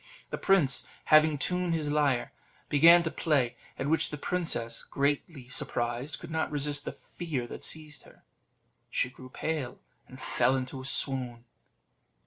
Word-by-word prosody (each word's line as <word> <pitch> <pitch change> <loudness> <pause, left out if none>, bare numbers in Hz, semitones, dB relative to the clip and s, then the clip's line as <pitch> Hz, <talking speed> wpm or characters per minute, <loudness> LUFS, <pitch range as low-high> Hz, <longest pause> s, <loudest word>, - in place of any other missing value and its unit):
The - - -2
prince 165 -10 +3 0.2
having 155 -1 +5
tuned 180 +3 +2
his 150 -2 -2
lyre, 145 -5 +1 0.4
began 170 +4 +7
to 165 - -2
play, 135 -7 +1 0.2
at - - -3
which 160 +3 +2
the 150 - -5
princess, 145 -10 -1
greatly 140 -1 -2
surprised, 120 +2 -2
could 170 - -10
not 160 0 -1
resist 145 0 -1
the - - -3
fear 150 -8 -5
that - - -9
seized 155 -2 -3
her; - - -19 0.7
she 125 - 0
grew 130 0 -12
pale, 140 -3 -3 0.3
and 130 - -12
fell 130 - +2
into 130 0 -4
a - - -9
swoon. 125 -3 0
145 Hz, 150 wpm, -29 LUFS, 130-160 Hz, 0.7 s, began